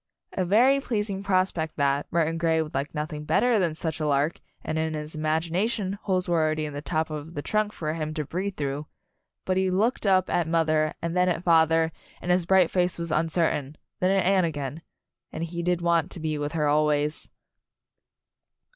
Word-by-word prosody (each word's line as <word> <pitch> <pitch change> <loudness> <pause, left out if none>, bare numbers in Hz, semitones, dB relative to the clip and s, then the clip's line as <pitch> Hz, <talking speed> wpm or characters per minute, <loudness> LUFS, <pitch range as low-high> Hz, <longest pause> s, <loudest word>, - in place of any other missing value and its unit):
A 185 - 0
very 245 +9 +4
pleasing 210 -6 -2
prospect 185 -5 0
that 140 0 0
Murton 165 -1 +1
Grey 165 -1 +2
would 155 - -10
like 140 - -3
nothing 150 0 -4
better 235 +8 +3
than 170 -4 0
such 160 0 -4
a 155 - -1
lark, 145 +3 +1 0.2
and 160 - -2
in 160 0 -1
his 150 0 -6
imagination 170 +6 -1
holes 185 -2 0
were 170 -2 +2
already 155 0 0
in 150 - -6
the 145 - -5
top 160 0 -1
of 155 +2 -6
the 145 - -4
trunk 215 -1 0
for 155 -6 -3
him 155 -1 -3
to 150 -2 -2
breathe 185 +6 -3
through 145 +1 -3 0.6
but 185 0 0
he 190 0 +2
looked 210 +4 +1
up 185 -1 +4
at 170 -2 0
mother, 155 -2 +1
and 170 +1 -2
then 180 0 +3
at 175 0 -1
father, 165 -1 +4 0.3
and 180 - -2
his 180 -1 +2
bright 190 -3 +4
face 180 -1 +1
was 170 -1 -4
uncertain; 155 -3 0 0.2
then 185 - +2
at 195 -1 +2
Anne 190 0 +4
again 145 -1 -3 0.5
and 160 - -4
he 170 +1 -4
did 175 0 0
want 170 0 +2
to 180 - -8
be 155 -1 -2
with 145 +1 -3
her 155 -2 +1
always. 150 0 +1
165 Hz, 200 wpm, -26 LUFS, 155-185 Hz, 0.6 s, very